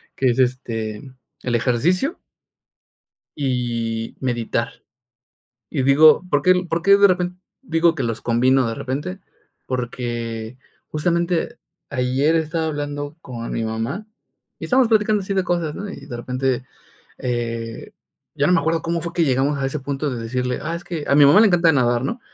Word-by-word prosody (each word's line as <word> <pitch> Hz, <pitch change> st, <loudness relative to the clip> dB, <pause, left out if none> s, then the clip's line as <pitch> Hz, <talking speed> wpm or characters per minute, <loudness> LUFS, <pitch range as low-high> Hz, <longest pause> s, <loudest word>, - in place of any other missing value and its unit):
que 135 Hz, -, +1 dB
es, 120 Hz, -, -2 dB
este, 115 Hz, -4 st, -1 dB, 0.4 s
el 120 Hz, -2 st, 0 dB
ejercicio. 165 Hz, -, +1 dB, 1.2 s
Y 120 Hz, -4 st, -2 dB
meditar. 120 Hz, -2 st, -1 dB, 1.0 s
Y 135 Hz, -5 st, -1 dB
digo, 150 Hz, +5 st, +6 dB
¿por 145 Hz, -3 st, +2 dB
qué 185 Hz, +5 st, +5 dB, 0.2 s
por 165 Hz, +1 st, 0 dB
qué 200 Hz, +3 st, +6 dB
de 200 Hz, 0 st, +7 dB
repen 180 Hz, -1 st, -1 dB, 0.2 s
digo, 165 Hz, -8 st, +2 dB
que -, -, -2 dB
los 115 Hz, -1 st, -3 dB
combino 125 Hz, +2 st, +3 dB
de 115 Hz, -, -2 dB
repente?, 145 Hz, +11 st, -4 dB, 0.5 s
porque, 120 Hz, -2 st, -4 dB, 0.3 s
justamente, 170 Hz, +7 st, -1 dB, 0.3 s
ayer 135 Hz, +4 st, +1 dB
estaba 160 Hz, 0 st, 0 dB
hablando 145 Hz, -1 st, -4 dB
con 120 Hz, -3 st, -6 dB
mi 115 Hz, -, -2 dB
mamá, 115 Hz, -, -3 dB, 0.5 s
y -, -, -10 dB
estábamos 255 Hz, -2 st, +3 dB
platicando 215 Hz, -2 st, +2 dB
así 195 Hz, +1 st, -3 dB
de 190 Hz, -, +2 dB
cosas, 170 Hz, -4 st, -1 dB
¿no?, 205 Hz, -, -5 dB
y -, -, -10 dB
de 120 Hz, -, -6 dB
repente, 125 Hz, +1 st, -1 dB, 0.6 s
eh, 115 Hz, -2 st, -4 dB, 0.4 s
ya 140 Hz, -, +1 dB
no 180 Hz, -, +3 dB
me 180 Hz, -, +4 dB
acuerdo 160 Hz, +1 st, 0 dB
cómo 170 Hz, 0 st, -1 dB
fue 170 Hz, +1 st, -5 dB
que 170 Hz, -, +3 dB
llegamos 135 Hz, +2 st, +1 dB
a 135 Hz, -, -2 dB
ese 135 Hz, +3 st, -3 dB
punto 140 Hz, +1 st, -2 dB
de 120 Hz, -3 st, -4 dB
decirle: 125 Hz, +2 st, -2 dB
"Ah, 165 Hz, +3 st, -3 dB
es 170 Hz, -, -10 dB
que 165 Hz, -4 st, -5 dB
a -, -, +4 dB
mi 145 Hz, 0 st, +7 dB
mamá 165 Hz, +9 st, +7 dB
le 225 Hz, -, +7 dB
encanta 170 Hz, -3 st, +4 dB
nadar", 120 Hz, -3 st, +2 dB
¿no?, 235 Hz, -, -3 dB
140 Hz, 170 wpm, -21 LUFS, 120-170 Hz, 1.2 s, de